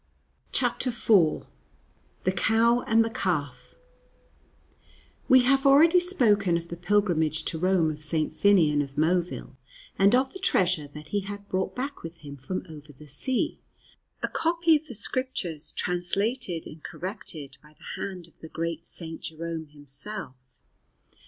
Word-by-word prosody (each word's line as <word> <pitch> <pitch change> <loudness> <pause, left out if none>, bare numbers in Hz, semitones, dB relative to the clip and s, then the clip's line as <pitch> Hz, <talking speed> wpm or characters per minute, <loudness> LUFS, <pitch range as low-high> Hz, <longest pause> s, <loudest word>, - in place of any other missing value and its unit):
CHAPTER 255 - +1
IV 205 -9 +3 0.8
THE 185 - +2
COW 230 +5 +3
AND 225 0 +4
THE 225 - -3
CALF 170 -10 -3 1.5
WE 260 0 +8
have 270 +2 +3
already 320 +6 +7
spoken 210 - +2
of 170 0 -7
the 170 - -5
pilgrimage 170 -5 +1
to 160 - -3
Rome 180 -3 +2
of 150 0 -8
St. 155 +1 -1
Finnian 155 -4 +4
of 140 0 -6
Moville, 165 -4 0 0.4
and 200 +4 +6
of 260 +1 +1
the 380 - -8
treasure 180 - +2
that 150 +1 -11
he 205 - 0
had 200 +1 -7
brought 190 -1 -2
back 275 +3 -4
with 165 0 -8
him 140 0 -7
from 140 +9 -5
over 155 -2 -11
the 150 +2 -15
sea 240 - -1 0.6
a - - +2
copy 335 0 +2
of 310 +1 -2
the 245 - -8
Scriptures 205 - -3
translated 180 +1 -1
and 155 +1 -11
corrected 155 -7 -6
by 150 0 -20
the - - -7
hand 185 -4 -5
of 170 - -23
the 160 - -10
great 165 0 -4
St. 165 -2 -7
Jerome 160 0 -5
himself. 145 +5 -9
180 Hz, 150 wpm, -27 LUFS, 155-225 Hz, 1.5 s, WE